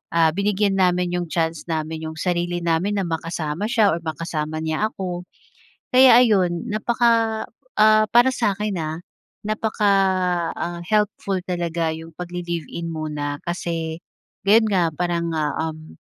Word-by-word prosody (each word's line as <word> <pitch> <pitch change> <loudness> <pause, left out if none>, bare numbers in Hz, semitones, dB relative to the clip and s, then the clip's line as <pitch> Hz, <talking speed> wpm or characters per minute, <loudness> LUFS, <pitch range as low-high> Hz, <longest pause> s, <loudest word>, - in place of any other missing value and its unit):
ah, 165 -1 +5
binigyan 200 +2 +1
namin 180 -1 +2
iyong 175 - -4
chance 165 -1 -2
namin 160 -1 -3
yung 160 - -7
sarili 175 0 -1
namin 170 +5 +1
na 195 - 0
makasama 165 +1 -3
siya 220 -3 +3
or 165 - -1
makasama 155 -1 -3
niya 160 +7 0
ako. 180 -3 -6 0.6
Kaya 255 -1 +7
ayun, 190 -3 +2
napaka 225 0 +1 0.3
ah 215 0 +6
para 240 +2 +6
sa 230 -5 +1
akin 210 0 -3
ha, 155 -1 -3 0.6
napaka 215 -1 0 0.7
ah, 175 0 -4
helpful 210 -2 0
talaga 170 -3 -1
yung 160 +1 -9
pag-li-live 175 -2 -4
in 170 0 -4
muna, 150 -2 -3
kasi 165 -2 -3 0.5
ganoon 220 +3 +5
nga, 180 -3 +3
parang 170 0 -1
ah, 150 -1 0 0.2
um 155 0 -13
175 Hz, 140 wpm, -22 LUFS, 160-210 Hz, 0.7 s, Kaya